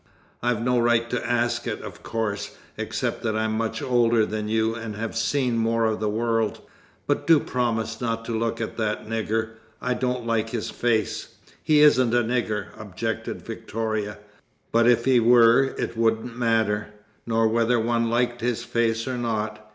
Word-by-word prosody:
"I've 120 -2 0
no 125 0 +2
right 120 0 +2
to 120 -1 -2
ask 120 0 0
it, - - -3
of - - -9
course, 110 -3 -3 0.2
except - - -3
that 110 -2 -1
I'm 110 0 0
much 110 0 -2
older 120 -3 +3
than 105 0 -3
you 110 +1 +1
and 115 -2 -6
have 110 +2 -4
seen 125 0 +1
more 115 0 +1
of 110 -1 0
the 110 -1 0
world 115 0 0 0.5
but - - -1
do 165 -2 +7
promise 115 -3 -2
not 115 -1 -2
to 115 - -3
look 115 0 -1
at 115 - -4
that 110 -2 -2
nigger. 110 0 -2 0.2
I 125 - -1
don't 125 -1 -2
like 115 -1 0
his 115 -2 -3
face." 110 -4 -1 0.3
"He 150 -1 +4
isn't 130 -5 +5
a 120 - +3
nigger," 115 -2 -1
objected 110 +2 -4
Victoria. 110 -2 -3 0.5
"But 115 +1 +4
if 115 -1 +4
he 130 -2 +5
were, 120 +2 +6
it - - -3
wouldn't 115 +1 0
matter 110 -3 +1 0.4
nor 115 -1 +2
whether 115 +2 +2
one 115 0 +1
liked 120 0 0
his 120 0 -1
face 115 -1 0
or 125 -1 -2
not. 110 -2 -2
115 Hz, 175 wpm, -24 LUFS, 110-120 Hz, 0.5 s, do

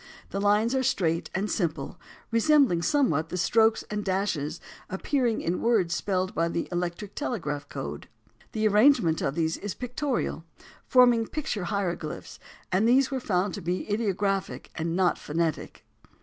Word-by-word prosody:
The 195 - -2
lines 210 +4 +3
are 265 - +2
straight 170 -9 0
and 195 +2 0
simple, 160 -9 -2 0.3
resembling 230 - +4
somewhat 170 - +1
the 180 - -3
strokes 220 +4 +3
and 210 0 -2
dashes 180 -5 -1 0.3
appearing 235 +4 0
in 170 +2 -1
words 215 -8 +2
spelled 185 0 -1
by 165 0 +1
the 170 0 -2
electric 175 +3 -3
telegraphic 150 - -3
code. - - -6 0.5
The 215 -2 +2
arrangement 210 - +4
of 135 - -1
these 160 -1 0
is 205 -2 -5
pictorial, 250 - -2 0.4
forming 245 -3 +5
picture 225 -11 -3
hieroglyphics, 175 -6 -3 0.3
and 195 +5 +3
these 265 +3 +4
were 265 - -1
found 190 -4 0
to 200 - -5
be 180 +2 -2
ideographic 200 -2 -1
and 165 0 -2
not 185 -1 +2
phonetic. 160 +1 -3
195 Hz, 150 wpm, -27 LUFS, 170-230 Hz, 0.5 s, forming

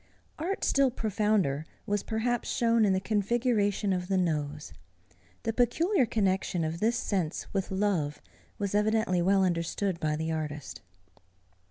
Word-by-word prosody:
Art 365 +6 -2
still 275 -1 +3
profounder 210 - 0 0.2
was 205 -1 0
perhaps 235 +2 -1
shown 230 -2 +3
in 195 - +3
the 190 - +2
configuration 210 -1 +1
of 180 -1 -2
the 190 0 +1
nose. 150 -4 -2 0.7
The 225 -1 -1
peculiar 260 - +2
connexion 190 -5 0
of 160 +1 -3
this 225 +4 +2
sense 180 -6 -2
with 195 -2 -1
love 190 -7 0 0.4
was 200 -1 -2
evidently 210 -3 +2
well 195 +2 +3
understood 175 +1 -1
by 155 -2 0
the 160 +1 -2
artist. 150 -3 -5
200 Hz, 140 wpm, -29 LUFS, 170-220 Hz, 0.7 s, still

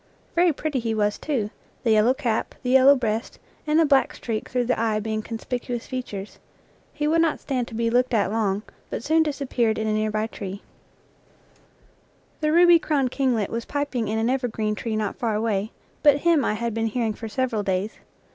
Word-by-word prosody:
Very 345 0 +4
pretty 295 -2 -2
he 225 -1 -2
was, 210 -1 0
too, 235 -9 -2 0.3
the 230 - +2
yellow 220 +4 +4
cap, 240 -6 -2
the 250 - 0
yellow 265 +2 +7
breast, 225 -3 -2 0.3
and 300 +1 +3
the 325 - +5
black 275 -2 +3
streak 220 -3 -4
through 250 -1 0
the 250 - 0
eye 220 -2 +1
being 215 0 -2
conspicuous 240 +2 -4
features. 215 -6 -6 0.5
He 295 0 -2
would 325 +2 +3
not 330 -2 +1
stand 255 -4 -2
to 225 - -9
be 230 0 0
looked 250 +2 +2
at 205 -2 +1
long, 210 -2 0 0.3
but - - -4
soon 320 +4 +3
disappeared 275 -7 0
in 220 - -1
a 215 - +1
near 215 0 0
by 215 0 -1
tree. 205 -3 -6
NATURE 195 +3 -9 0.9
LEAVES - - -34
The 305 0 +2
ruby 345 +1 +7
crowned 275 -6 0
kinglet 250 -8 0
was 230 0 -3
piping 285 -6 -2
in 215 +2 -1
an 225 +1 +1
ever 260 -1 0
green 215 -2 -2
tree 220 +1 -3
not 215 -2 -2
far 225 -3 -1
away, 215 -1 -1 0.3
but 290 -2 +6
him 335 -4 +3
I 215 - 0
had 235 +1 -2
been 225 0 0
hearing 225 -1 -1
for 225 +1 -7
several 245 -1 -1
days. 195 +2 -2
235 Hz, 205 wpm, -24 LUFS, 215-270 Hz, 0.9 s, yellow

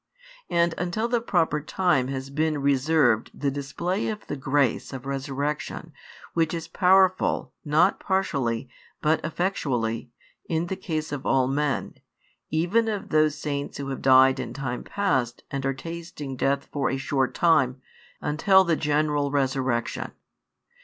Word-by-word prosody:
And 170 0 +2
until 180 +6 -1
the 240 -1 +1
proper 165 -8 +1
time 155 -5 +1
has 135 0 -5
been 155 +1 0
reserved 140 -4 +2
the 140 -1 -1
display 170 +8 -2
of 215 -1 -4
the - - -4
grace 135 -2 0
[of 130 0 -7
resurrection], 140 +2 -3 0.4
which 165 0 +1
is 165 -1 -5
powerful, 185 +1 +3
not 160 +5 +3
partially, 140 - -1 0.3
but 155 +1 +1
effectually, 130 - -1 0.4
in 165 0 0
the 190 - -3
case 155 -4 -4
of 145 -2 -4
all 130 -1 +3
men, 145 +1 -1 0.6
even 175 +9 +2
of 210 -3 -3
those 155 -1 +3
saints 145 -2 -4
who 140 -1 -5
have 135 - -4
died 130 0 +6
in - - -5
time 130 -3 -4
past 130 -13 -1
and 135 -1 -2
are 135 - +1
tasting 165 -2 -7
death 140 +2 0
for 140 -2 0
a 135 - -1
short 135 0 -1
time, 135 -7 +3 0.4
until 190 +6 +4
the 170 -3 +2
general 150 -1 +1
resurrection. 130 -4 -1
145 Hz, 145 wpm, -25 LUFS, 135-170 Hz, 0.6 s, died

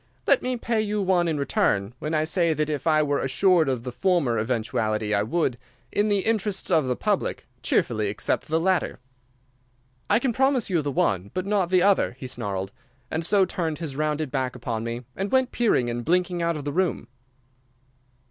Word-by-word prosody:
'Let - - +4
me 255 0 -2
pay 230 -1 0
you 210 0 -1
one 185 -3 +2
in 160 -2 0
return 105 -6 0
when 155 +1 -2
I 155 - +2
say 165 0 +1
that 155 +1 -1
if 145 +1 -3
I 155 -1 +4
were 145 -1 0
assured 160 +3 +3
of 125 -3 -2
the 125 - -5
former 145 - +1
eventuality 110 -2 -1
I 100 - +3
would, 125 +1 -1 0.3
in 210 +1 +1
the 200 -1 +2
interests 210 -3 0
of 155 -5 +3
the 125 - 0
public, 205 - -1 0.2
cheerfully 110 -2 +1
accept 105 - -2
the 160 +1 +1
latter.' 185 +1 0 1.1
"'I - - +5
can 245 0 0
promise 265 -4 +1
you 170 -3 +2
the 145 - -3
one, 100 -7 0
but 185 - -1
not 200 -3 +1
the 180 -1 +4
other,' 200 -10 +3
he 130 - -8
snarled, 100 -6 -4 0.4
and 160 +1 -1
so 195 +3 +4
turned 165 -4 -3
his 155 -4 -5
rounded 150 -1 -1
back 130 -3 -2
upon 115 -2 -4
me, 120 +1 -5
and 195 +1 -3
went 260 -1 +2
peering 215 - +2
and 120 0 -3
blinking 180 +2 +1
out 170 -1 0
of 145 - -7
the 145 - -2
room. 185 0 0
155 Hz, 195 wpm, -25 LUFS, 125-190 Hz, 1.1 s, I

